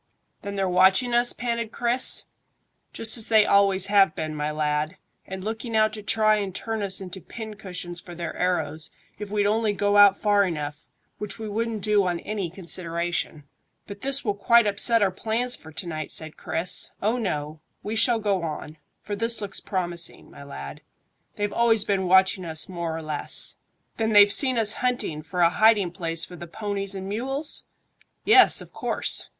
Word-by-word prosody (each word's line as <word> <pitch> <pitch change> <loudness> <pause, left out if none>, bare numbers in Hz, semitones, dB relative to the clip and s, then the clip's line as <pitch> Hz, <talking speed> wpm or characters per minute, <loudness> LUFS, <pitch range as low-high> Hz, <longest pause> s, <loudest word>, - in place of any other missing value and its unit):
"Then 200 0 -6
they're 195 -1 0
watching 190 +7 +3
us?" 240 +1 +5
panted 235 -2 -3
Chris. 240 +2 +2 0.7
"Just 225 +1 +3
as 220 - +4
they 220 -2 +5
always 195 -1 +3
have 195 -4 +3
been, 155 -1 -4
my 150 0 -3
lad, 150 +2 -2 0.3
and 190 0 -7
looking 225 +2 -5
out 215 0 +3
to 215 - -7
try 215 0 +2
and 195 -3 -4
turn 225 -1 -4
us 195 -2 0
into 190 0 -8
pin 220 +2 -8
cushions 180 -3 -7
for 175 - -11
their 170 0 -6
arrows, 160 -4 -2 0.3
if 210 -1 -6
we'd 205 0 0
only 215 0 +1
go 205 0 +1
out 200 -1 +7
far 205 -1 +2
enough, 150 -5 -5 0.3
which 210 -1 -6
we 220 -1 -6
wouldn't 220 0 -3
do 210 -3 +2
on 175 -1 -2
any 205 -5 -4
consideration." 170 -3 -2 0.4
"But 200 0 -10
this 275 0 -1
will 205 - +1
quite 235 +3 +4
upset 210 +2 +4
our 195 - +2
plans 230 +6 -2
for 160 - -14
to 180 - -4
night," 155 -2 -5
said 155 -1 -5
Chris. 170 +3 +1
"Oh 225 +5 0
no. 155 -7 -4 0.2
We 215 +2 -4
shall 230 +1 +3
go 200 -4 0
on; 155 -1 -6 0.2
for 205 - -6
this 230 +2 +3
looks 200 -2 -3
promising, 175 -3 -3
my - - -12
lad. 70 - -9 0.5
They've 205 0 -3
always 225 -3 +2
been 190 -2 0
watching 190 0 +3
us 160 -2 -3
more 170 -3 -4
or 165 - -7
less." 155 -1 -1 0.4
"Then 220 -1 0
they've 205 0 +7
seen 260 -3 +3
us 220 -2 +2
hunting 245 -11 -2
for 175 +3 -4
a 170 -1 +5
hiding 210 -3 +3
place 165 -2 -2
for 180 - -11
the 175 0 -9
ponies 200 +1 -2
and 190 0 -6
mules?" 270 +9 -3 0.6
"Yes, 400 -3 +6
of - - -13
course." - - 0
200 Hz, 185 wpm, -24 LUFS, 175-220 Hz, 0.7 s, out